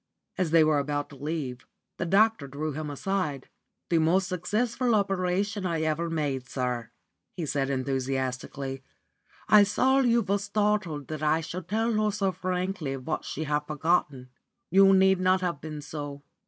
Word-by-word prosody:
As 180 -3 0
they 165 0 +6
were 155 -1 +3
about 145 +1 -2
to - - -11
leave, 140 -3 -4 0.3
the 170 - -2
doctor 205 -4 +3
drew 150 +3 -4
him 150 +1 -4
aside. 150 -2 -2 0.4
"The 165 - +4
most 175 +4 +2
successful 225 +7 0
operation 195 +1 0
I 170 -3 -1
ever 160 +2 0
made, 140 -6 -2
sir," 125 -3 -2 0.5
he 170 - -2
said, 140 -1 -1
enthusiastically. 135 0 -2 0.7
"I 210 - +8
saw 260 +6 +3
you 235 -3 +3
were 200 +1 0
startled 205 -7 -1
that 155 -1 -5
I 155 +1 +2
should 170 +2 -6
tell 225 +4 0
her 215 0 +2
so 200 -2 0
frankly 180 -6 -3
what 135 +4 -4
she 160 - -4
had 150 -1 +1
forgotten. 150 -4 0 0.4
You 195 +1 +7
need 190 -1 +5
not 185 0 +3
have 175 -5 -2
been 155 -1 -6
so. 145 -1 -7
165 Hz, 160 wpm, -27 LUFS, 145-195 Hz, 0.7 s, I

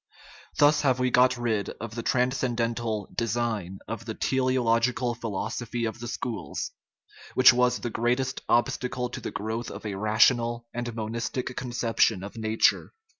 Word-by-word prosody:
Thus 145 0 +5
have 130 -3 +2
we 125 0 +1
got 125 +1 +4
rid 110 -4 -1
of 115 0 -6
the 115 - -4
transcendental 120 -4 0
"design" 110 -5 -2
of 115 0 -5
the 110 -1 -5
teleological 125 -2 +1
philosophy 115 +1 -3
of 110 +1 -4
the 120 - -6
schools, 120 -1 -4 0.6
which 130 0 +8
was 125 0 +3
the 120 - -4
greatest 125 +4 0
obstacle 125 +1 +1
to - - -7
the - - -4
growth 110 +3 -4
of - - -9
a 105 - -3
rational 115 +3 +2
and 120 -1 -4
mon 110 -1 -4
istic 120 +2 -3
conception 120 -6 +1
of 100 - -8
nature. 110 - +1
120 Hz, 150 wpm, -27 LUFS, 110-125 Hz, 0.6 s, which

